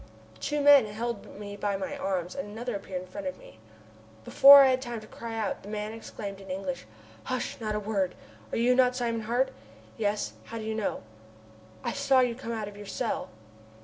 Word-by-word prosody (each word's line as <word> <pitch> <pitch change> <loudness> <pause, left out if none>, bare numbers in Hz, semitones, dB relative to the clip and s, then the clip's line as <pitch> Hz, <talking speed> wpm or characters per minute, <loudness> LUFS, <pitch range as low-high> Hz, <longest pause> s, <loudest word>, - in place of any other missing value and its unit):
Two 295 0 -1
men 285 -5 +7
held 215 -1 -5
me 205 -1 -7
by 205 -1 -1
the 190 -1 -4
arms, 185 -2 -2
and 185 - -5
another 230 +2 -4
appeared 190 -2 -5
in - - -13
front 285 +10 -6
of 275 - -4
me. 110 - -16 0.7
Before 280 0 +10
I 265 - +5
had 255 0 +1
time 240 -3 -5
to 215 - -12
cry 230 +1 -7
out 220 -3 -2
the 200 - -10
man 210 0 -4
exclaimed 200 -3 -7
in 195 - -12
English: 185 - -4 0.4
"Hush! 255 -1 -3
not 215 -1 -2
a - - 0
word! 200 -3 -1 0.4
Are - - -1
you 240 +2 +4
not 250 0 +4
Simon 235 -2 -1
Hart?" 245 +4 0 0.5
"Yes, 210 -2 -1
how 230 - -7
did 220 - -5
you 220 - -2
know?" 220 - -2 0.8
"I - - -1
saw 275 -2 +3
you 245 -2 +2
come 235 -1 -6
out 220 -2 -3
of 205 - -9
your 205 -1 -9
cell." 240 +2 -2
220 Hz, 210 wpm, -28 LUFS, 200-245 Hz, 0.8 s, Before